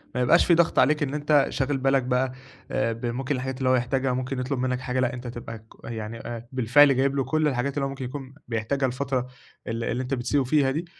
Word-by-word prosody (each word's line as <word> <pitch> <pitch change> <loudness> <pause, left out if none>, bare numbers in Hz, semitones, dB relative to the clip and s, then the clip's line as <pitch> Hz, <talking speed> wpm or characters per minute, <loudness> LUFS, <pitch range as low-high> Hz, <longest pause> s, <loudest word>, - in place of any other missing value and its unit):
ما 125 - +1
يبقاش 145 +8 +5
في 175 - +4
ضغط 170 0 +3
عليك 150 +3 +3
إن 140 -1 -2
أنت 145 -1 +3
شاغل 135 +1 -1
بالك 135 0 +2
بقى 125 +1 0 0.4
آآ، 115 -3 0
بممكن 120 +4 -2
الحاجات 130 0 -4
اللي 130 -1 0
هو 130 - +5
يحتاجها، 130 +1 0
ممكن 130 +1 -3
يطلب 130 +1 -2
منك 125 0 0
حاجة، 130 0 -2
لأ، 130 +1 +1
أنت 125 -1 -7
تبقى 115 -1 -7
ك - - -23 0.2
يعني 115 -1 -5
أ 120 0 -7
بالفعل 130 +3 +5
جايب 135 +2 +1
لُه 135 - +1
كل 155 +2 +1
الحاجات 135 0 -1
اللي 140 -1 -1
هو - - -2
ممكن 135 -1 -6
يكون 130 +1 -7
بيحتاجها 120 +4 -1
الفترة 130 0 -2 0.4
ال 115 +1 -3
اللي 125 +2 -1
أنت 130 +2 -4
بتسيبُه 135 +2 +1
فيها 135 +1 +2
دي، 160 +6 -3
130 Hz, 235 wpm, -25 LUFS, 125-140 Hz, 0.4 s, يبقاش